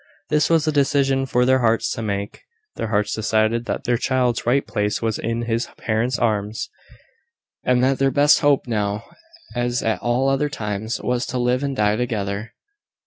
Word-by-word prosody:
This 150 Hz, -1 st, +2 dB
was 165 Hz, -2 st, +3 dB
a -, -, +3 dB
decision 135 Hz, -2 st, +2 dB
for 125 Hz, -1 st, +2 dB
their 130 Hz, +1 st, +4 dB
hearts 115 Hz, -1 st, +1 dB
to -, -, -3 dB
make. 100 Hz, -2 st, -4 dB, 0.3 s
Their -, -, -3 dB
hearts 105 Hz, -1 st, 0 dB
decided 110 Hz, +2 st, +1 dB
that -, -, -3 dB
their 120 Hz, -1 st, +1 dB
child's 125 Hz, -3 st, 0 dB
right 135 Hz, +3 st, +2 dB
place 105 Hz, 0 st, -1 dB
was 110 Hz, -2 st, -1 dB
in 115 Hz, +1 st, -2 dB
his 115 Hz, 0 st, -1 dB
parents' 120 Hz, +3 st, 0 dB
arms; 105 Hz, -2 st, -1 dB, 0.9 s
and 125 Hz, 0 st, +2 dB
that 135 Hz, +1 st, +2 dB
their 135 Hz, 0 st, +3 dB
best 145 Hz, +3 st, +5 dB
hope 145 Hz, -2 st, +3 dB
now, 105 Hz, -2 st, -1 dB, 0.5 s
as 120 Hz, 0 st, -1 dB
at 110 Hz, -, 0 dB
all 120 Hz, +3 st, +1 dB
other 135 Hz, +2 st, +1 dB
times, 110 Hz, -3 st, -3 dB
was 125 Hz, 0 st, -1 dB
to 130 Hz, -, -3 dB
live 125 Hz, +1 st, +1 dB
and 140 Hz, -1 st, -2 dB
die 105 Hz, -2 st, +2 dB
together. 110 Hz, -2 st, -3 dB
120 Hz, 180 wpm, -22 LUFS, 110-130 Hz, 0.9 s, best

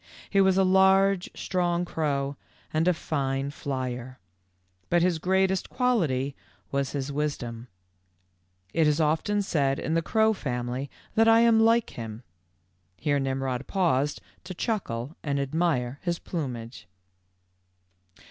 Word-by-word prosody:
He 195 Hz, -, +4 dB
was 190 Hz, -1 st, +4 dB
a 195 Hz, -, +5 dB
large, 190 Hz, 0 st, +4 dB
strong 175 Hz, -1 st, 0 dB
crow, 140 Hz, -4 st, -1 dB, 0.4 s
and 160 Hz, +2 st, +2 dB
a 180 Hz, -, +5 dB
fine 135 Hz, -3 st, -2 dB
flyer. 130 Hz, -3 st, -4 dB, 0.7 s
But 175 Hz, -1 st, +3 dB
his 175 Hz, -3 st, +2 dB
greatest 190 Hz, +2 st, +1 dB
quality 160 Hz, -, +1 dB, 0.4 s
was 140 Hz, -1 st, -1 dB
his 140 Hz, -1 st, -3 dB
wisdom. 125 Hz, -5 st, -3 dB, 1.1 s
It 160 Hz, -2 st, +3 dB
is 150 Hz, +1 st, +2 dB
often 165 Hz, +7 st, +1 dB
said 140 Hz, -7 st, +1 dB
in 160 Hz, -, -2 dB
the 165 Hz, -, +2 dB
crow 220 Hz, +5 st, +2 dB
family 125 Hz, -, -3 dB, 0.2 s
that 225 Hz, +1 st, +4 dB
I 225 Hz, 0 st, +7 dB
am 230 Hz, -1 st, +5 dB
like 230 Hz, +1 st, +3 dB
him." 115 Hz, 0 st, -7 dB, 0.7 s
Here 145 Hz, -2 st, +1 dB
Nimrod 135 Hz, -1 st, -2 dB
paused 150 Hz, -7 st, +1 dB, 0.2 s
to 185 Hz, 0 st, -7 dB
chuckle 155 Hz, -, -3 dB
and 140 Hz, -2 st, -1 dB
admire 140 Hz, -3 st, 0 dB
his 175 Hz, -2 st, -1 dB
plumage. 125 Hz, -10 st, -6 dB
155 Hz, 130 wpm, -27 LUFS, 135-190 Hz, 1.1 s, I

